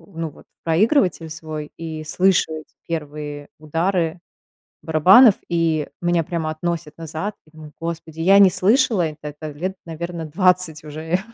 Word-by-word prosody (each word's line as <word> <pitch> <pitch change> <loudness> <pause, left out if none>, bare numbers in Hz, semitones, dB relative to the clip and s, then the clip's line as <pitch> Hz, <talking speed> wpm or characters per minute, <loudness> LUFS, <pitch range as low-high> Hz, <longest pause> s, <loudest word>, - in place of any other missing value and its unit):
ну 165 0 -3
вот - - -17 0.2
в - - -90
проигрыватель 175 - +2
свой 155 -1 -7
и 160 -1 -6
слышу 180 +2 +2
эти 155 -4 -8
первые 150 -2 -5
удары 165 +2 -1 0.6
барабанов, 190 - +6
и 165 -3 0
меня 175 -1 +1
прямо 160 -1 -3
относит 155 -1 -4
назад. 165 +5 -5
Я 155 - -24
думаю: 155 -1 -12
"Господи, 165 -1 -6
я 195 +4 +6
не 195 -2 +8
слышала 205 +1 +2
это 155 -1 -6
это 150 +1 -7
лет, 180 +6 -4
наверно, 170 0 -5
20 180 -1 +2
уже 155 +4 -2
165 Hz, 150 wpm, -21 LUFS, 155-180 Hz, 0.6 s, не